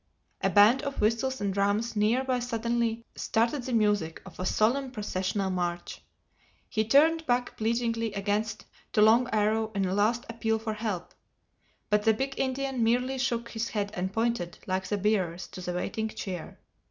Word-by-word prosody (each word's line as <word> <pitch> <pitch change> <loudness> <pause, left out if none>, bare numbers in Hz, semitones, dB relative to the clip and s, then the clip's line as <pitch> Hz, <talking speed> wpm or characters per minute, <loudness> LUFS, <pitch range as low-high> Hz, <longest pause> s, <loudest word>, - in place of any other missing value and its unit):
A - - +2
band 215 +6 +6
of 280 -1 -4
whistles 230 +5 +1
and 200 -1 0
drums 205 +4 0
near 220 +5 +2
by 255 -2 0
suddenly 235 -1 -1
started 235 +5 0
the 255 - -5
music 210 -8 +1
of 190 -4 -13
a 185 - -1
solemn 260 +5 +2
processional 195 -4 -2
march. 175 -1 -3 0.7
He 215 0 0
turned 320 +7 +4
back 245 0 0
pleadingly 230 0 0
again 205 +1 0 0.5
to 210 - +4
Long 235 +3 +5
Arrow 220 +1 +1
in 195 -1 +1
a 185 - -1
last 220 +4 +1
appeal 225 -1 -1
for 220 0 -3
help. 210 -5 -4 0.8
But 210 0 +4
the 220 0 +3
big 270 +4 -2
Indian 265 -1 -1
merely 250 +3 +1
shook 235 -2 -1
his 225 0 -3
head 205 -2 -2
and 185 +1 -2
pointed, 225 -5 -1
like 190 0 -2
the 205 - 0
bearers, 185 -4 0
to 185 - -9
the 180 0 -3
waiting 220 +5 -2
chair. 190 -6 -6
220 Hz, 170 wpm, -28 LUFS, 200-240 Hz, 0.8 s, band